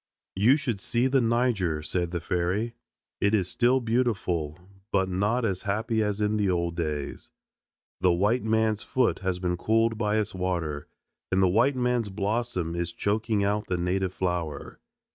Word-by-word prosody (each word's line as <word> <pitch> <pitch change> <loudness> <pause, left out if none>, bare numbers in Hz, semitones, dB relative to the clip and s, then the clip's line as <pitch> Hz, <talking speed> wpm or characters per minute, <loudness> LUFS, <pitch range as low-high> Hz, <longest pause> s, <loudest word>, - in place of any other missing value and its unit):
"You 115 +9 +5
should 120 -9 -3
see 120 +5 0
the 135 0 +3
Niger," 115 -10 +1
said 85 +2 -1
the 85 0 -3
fairy. 90 +7 -1 0.5
"It 100 +2 +3
is 95 -4 +1
still 125 +2 +3
beautiful, 105 - 0 0.3
but 95 -1 +2
not 105 +6 +1
as 95 -4 -1
happy 110 +3 0
as 105 -1 -1
in 105 0 +1
the 100 -2 +1
old 85 -2 0
days. 75 -4 -4 0.7
The 90 - +4
white 105 +8 +2
man's 110 -1 +1
foot 130 -3 +1
has 95 -1 -1
been 90 -1 -1
cooled 115 +3 +1
by 105 -1 +1
its 105 -1 -1
water, 85 -5 -2 0.4
and 95 +1 +3
the - - +5
white 115 +9 +3
man's 125 -3 0
blossom 100 -3 -2
is 85 0 -2
choking 105 +3 0
out 105 +1 0
the 90 - -1
native 90 +2 0
flower." 85 -5 -3
100 Hz, 165 wpm, -27 LUFS, 90-115 Hz, 0.7 s, You